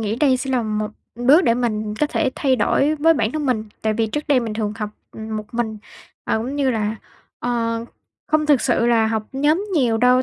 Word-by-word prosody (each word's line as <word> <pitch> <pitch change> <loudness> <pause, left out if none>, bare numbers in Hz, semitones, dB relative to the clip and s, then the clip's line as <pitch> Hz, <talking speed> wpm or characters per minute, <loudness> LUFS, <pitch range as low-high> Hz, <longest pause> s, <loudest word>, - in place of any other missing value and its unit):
nghĩ 220 +1 -2
đây 265 -2 +3
sẽ 265 +1 -4
là 250 -3 +1
một 215 -1 -2 0.2
đước 265 +9 +4
để 230 - +4
mình 215 -3 -2
có 300 - +4
thể 295 -3 0
thay 265 -3 +1
đổi 280 +7 +2
với 320 +2 +4
bản 225 -5 0
thân 305 -2 -2
mình. 220 -4 0 0.2
Tại 220 0 +1
vì 225 0 0
trước 295 +7 -3
đây 270 -3 +4
mình 225 -2 -4
thường 210 -1 -2
học 210 -1 -4 0.2
một 220 -1 -5
mình, 225 -2 -2 0.5
ờ, - - 0
cũng 255 +6 -4
như 275 -2 +2
là, 220 -2 -1 0.4
ờ, 230 -1 -1 0.4
không 305 -1 +1
thực 290 -4 +4
sự 240 -2 +1
là 225 -2 +3
học 220 -1 -1
nhóm 300 +8 +1
nhiều 240 -7 +2
đâu, 250 +1 +4
240 Hz, 225 wpm, -21 LUFS, 220-275 Hz, 0.5 s, đước